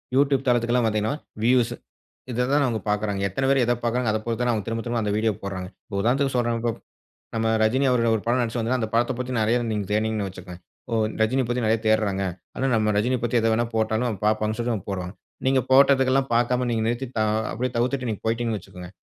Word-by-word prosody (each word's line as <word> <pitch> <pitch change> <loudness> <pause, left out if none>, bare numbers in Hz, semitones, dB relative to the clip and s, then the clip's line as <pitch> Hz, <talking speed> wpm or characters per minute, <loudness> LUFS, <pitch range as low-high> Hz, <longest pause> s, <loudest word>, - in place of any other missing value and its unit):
YouTube 140 -1 +3
தளத்துக்கு 120 -1 +2
எல்லாம் 125 -2 +3
வந்தீங்கன்னா, 110 +3 0 0.3
வியூஸ். 120 0 +3 0.6
இத 125 +1 0
தான் 145 0 +4
அவுங்க 115 -4 -1
பார்க்குறாங்க. 105 -1 -1
எத்தன 135 +8 -1
பேர் 135 -1 +4
எத 120 - +2
பார்க்கிறாங்க. 120 0 +1
அதப் 110 0 -2
பொறுத்து 115 +1 -2
தான் 120 - +2
அவுங்க 110 -3 -2
திரும்ப, 115 0 -2
திரும்ப 120 0 0
அந்த 105 -1 -1
வீடியோ 110 0 +2
போட்றாங்க. 95 -2 -5 0.2
இப்ப 100 - -6
உதாரணத்திற்கு 135 +4 +1
சொல்றேன் 120 -1 +1
இப்ப 120 0 0 0.7
நம்ம 115 0 0 0.2
ரஜினி 130 +6 +2
அவர்கள் 115 -2 +2
ஒரு 110 - -2
படம் 120 +2 +2
நடிச்சு 120 0 -2
வந்தா, 115 +3 0
அந்த 110 - -2
படத்த 120 +3 +2
பத்தி 125 0 -4
நிறைய 110 +3 +2
நீங்க 105 -2 -2
தேடினீங்கன்னு 110 -1 0
வச்சிக்கோங்களேன், 90 -1 -10 0.3
ஓ! - - 0 0.3
ரஜினிய 130 +4 +2
பத்தி 120 -1 0
நிறைய 110 +1 +2
தேட்றாங்க. 100 -3 +2 0.3
அதுனா 135 +1 0
நம்ம 105 -1 +2
ரஜினிய 125 +4 +1
பத்தி 120 0 +2
எத 115 - +2
வேணா 120 +2 +1
போட்டாலும் 110 -1 0
பார்ப்பாங்கன்னு 110 +1 +1
சொல்லி 120 0 0
அவன் 100 - -8
போட்றான். 90 -1 -4 0.3
நீங்க 135 0 +4
போட்டதுக்கு 135 -1 +5
எல்லாம் 135 -2 +1
பார்க்காம 125 +1 +1
நீங்க 110 -1 0
நிறுத்தி 120 +3 -2
த - - +1
அ - - +1 0.2
அப்பிடியே 125 +1 -2
தவிர்த்துட்டு 125 +1 0
நீங்க 105 - -4
போயிட்டீங்கன்னு 115 -1 -1
வச்சுக்கோங்க. 90 -1 -11
115 Hz, 220 wpm, -24 LUFS, 110-125 Hz, 0.7 s, போட்டதுக்கு